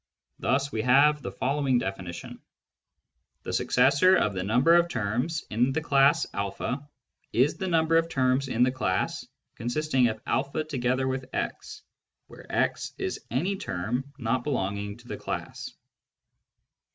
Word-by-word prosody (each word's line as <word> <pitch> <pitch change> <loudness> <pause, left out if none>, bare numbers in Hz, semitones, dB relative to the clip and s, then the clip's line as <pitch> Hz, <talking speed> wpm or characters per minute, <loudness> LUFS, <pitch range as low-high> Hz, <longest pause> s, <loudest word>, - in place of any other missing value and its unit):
Thus 140 +2 0
we 110 - -1
have 140 +5 +4
the - - -5
following 135 -1 +1
definition: 95 -5 -5 0.5
— - - -52
The - - -5
successor 185 +6 +4
of 105 - +1
the 95 - -2
number 125 - +4
of 170 0 +4
terms 125 +7 -1
in 120 +5 +2
the 160 - 0
class 140 -1 +4
a 100 +6 -3 0.5
is 130 +5 +2
the 190 - -3
number 165 -1 +3
of 165 0 +1
terms 130 -1 +1
in 120 -1 +2
the 125 - +3
class 95 -8 -1 0.3
consisting 130 +1 +1
of 110 -1 -4 0.3
a 155 - 0
together 130 -3 -1
with 130 0 -3
x, - - -4 0.4
where - - -13
x - - 0
is - - -4
any 180 - -1
term 120 - -3
not 120 -1 -1
belonging 100 -6 -2
to 120 0 -17
the - - -5
class. - - -5
130 Hz, 150 wpm, -27 LUFS, 115-150 Hz, 0.5 s, have